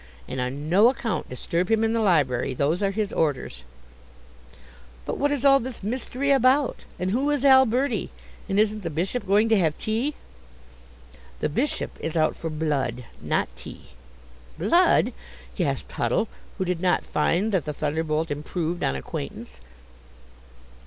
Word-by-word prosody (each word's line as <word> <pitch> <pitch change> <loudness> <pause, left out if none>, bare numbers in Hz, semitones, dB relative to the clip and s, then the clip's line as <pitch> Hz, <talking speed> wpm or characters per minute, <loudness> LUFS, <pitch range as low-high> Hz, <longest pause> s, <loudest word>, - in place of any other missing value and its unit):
And 130 0 -3
on 135 +4 -4
no 200 +8 +6
account 225 - -3
disturb 170 +8 -2
him 225 0 +3
in 225 0 +1
the 230 - +1
library. 140 - +2
Those 155 +8 0
are 200 - +2
his 205 +1 -2
orders." 130 - -1 1.4
"But - - -4
what 285 - +2
is 285 -2 -1
all 275 0 +7
this 245 -4 -7
mystery 255 +5 -2
about? 270 +1 +3
And 185 +1 -1
who 265 +7 +1
is 290 -2 0
Alberti? 265 0 +4 0.4
And 195 +1 +1
isn't 215 0 +1
the 170 - -3
Bishop 185 +8 -2
going 205 +3 +4
to 220 -2 +4
have 160 -4 +1
tea?" 235 +7 -1 1.2
"The - - 0
Bishop 260 - -2
is 160 +1 -3
out 155 -1 +2
for 165 - -5
blood, 140 -6 -2 0.2
not - - 0
tea." - - -11 0.7
"Blood!" - - +3 0.4
gasped - - -2
Huddle, - - 0 0.3
who 190 - -1
did 180 -2 -2
not 180 -1 +1
find 175 +8 +1
that 185 -7 0
the 150 - -3
thunderbolt 155 +1 -1
improved 165 +3 -3
on 65 - +1
acquaintance. 65 - -7
185 Hz, 150 wpm, -25 LUFS, 155-230 Hz, 1.4 s, all